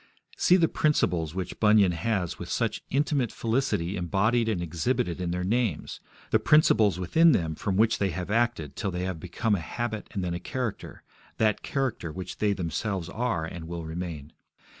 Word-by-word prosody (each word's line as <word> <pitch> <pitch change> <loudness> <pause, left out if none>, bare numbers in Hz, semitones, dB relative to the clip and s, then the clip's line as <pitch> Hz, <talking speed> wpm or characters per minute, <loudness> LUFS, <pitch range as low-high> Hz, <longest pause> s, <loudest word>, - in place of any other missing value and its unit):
See 180 - +4
the 170 -3 +4
principles 90 - +1
which 95 -2 -4
Bunyan 105 -3 +5
has 90 0 -2
with - - -7
such - - -1
inimitable 140 -3 0
felicity 115 -7 0
embodied 105 +6 +1
and 105 -5 0
exhibited 85 +2 -1
in 90 - -1
their 90 +1 -2
names, 110 -2 -1 0.3
the - - +4
principles 110 - +4
within 160 - +5
them 80 -7 0
from 95 +4 -2
which 110 +1 +3
they 100 - +1
have 90 +2 -4
acted 115 - 0
till 105 - -2
they 90 -1 -3
have 90 -3 -3
become 95 +7 -1
a 100 - +2
habit 110 +6 -4
and 95 - -3
then 90 -1 -2
a 85 - -3
character, 125 +2 -5 0.3
that 110 -2 +2
character 130 - -2
which 90 +3 -7
they 105 -1 +2
themselves 95 0 -2
are 110 -6 -1
and 80 0 -7
will 85 -1 -5
remain. 80 -3 -6
95 Hz, 180 wpm, -27 LUFS, 85-115 Hz, 0.3 s, Bunyan